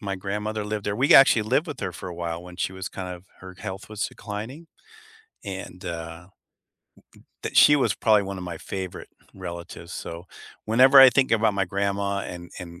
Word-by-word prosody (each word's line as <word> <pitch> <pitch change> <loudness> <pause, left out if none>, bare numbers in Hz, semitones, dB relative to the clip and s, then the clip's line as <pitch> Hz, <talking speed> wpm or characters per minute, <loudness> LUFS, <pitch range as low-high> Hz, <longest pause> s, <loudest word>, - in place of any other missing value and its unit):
my 100 -1 -3
grandmother 105 +2 -3
lived 105 0 -4
there. 100 0 -1
We 140 +8 +4
actually 135 -5 +7
lived 130 +10 +1
with 145 - -7
her 90 - -3
for 85 - -8
a 90 - -7
while 85 0 -4
when 90 0 -12
she 95 - -2
was 95 0 -6
kind 90 -1 -6
of 90 +1 -14 0.2
her 95 0 -11
health 95 +1 -7
was 110 0 -3
declining, 115 +10 -8 0.8
and, 95 -2 -7
uh 85 +1 -7 1.2
that - - -4
she 150 - +8
was 115 -8 +1
probably 105 -1 +3
one 95 0 -6
of 90 - -6
my 90 -1 -6
favorite 95 -2 -6 0.3
relatives, 85 0 -8
so, 85 +2 -7 0.4
whenever 130 +5 +6
I 135 -1 +10
think 130 +2 +2
about 110 -2 +3
my 100 -1 +1
grandma 100 +1 -1
and 90 -2 -8
and 85 -1 -10
100 Hz, 190 wpm, -25 LUFS, 90-110 Hz, 1.2 s, I